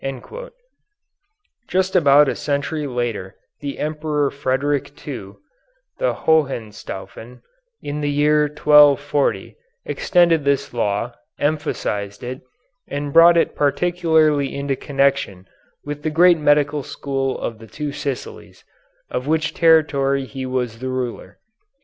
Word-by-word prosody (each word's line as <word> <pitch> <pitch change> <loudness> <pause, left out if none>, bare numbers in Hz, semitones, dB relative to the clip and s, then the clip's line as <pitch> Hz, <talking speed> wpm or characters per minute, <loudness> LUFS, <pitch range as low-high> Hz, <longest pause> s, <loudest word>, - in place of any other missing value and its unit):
Just 190 +1 0
about 145 -4 +6
a - - -1
century 145 +1 -2
later 120 -7 -3 0.2
the 140 -1 -5
Emperor 150 -2 -1
Frederick 140 +1 -1 0.2
II, 100 -9 -6 0.7
the - - +1
Hohenstaufen, 120 -5 -2 0.4
in 145 +1 -4
the 145 - -1
year 150 +1 +3
1240, 145 -1 +3 0.3
extended 170 -4 +2
this 140 -1 0
law, 115 +1 -1 0.2
emphasized 135 -9 -2
it, 125 +2 -6 0.5
and 145 0 -4
brought 170 +1 +7
it 165 - +2
particularly 155 -1 +1
into 140 -1 -2
connection 135 -10 -1 0.4
with 145 0 -5
the 155 - -1
great 170 +2 +5
medical 145 0 +2
school 135 0 -3
of 115 -2 -5
the 115 - -12
Two 150 +5 -5
Sicilies, 140 -2 -6 0.5
of 125 - -3
which 155 0 0
territory 140 -5 +3
he 130 0 -6
was 125 -3 -3
the 130 +1 -4
ruler. 130 -2 -5
145 Hz, 115 wpm, -20 LUFS, 130-150 Hz, 0.7 s, brought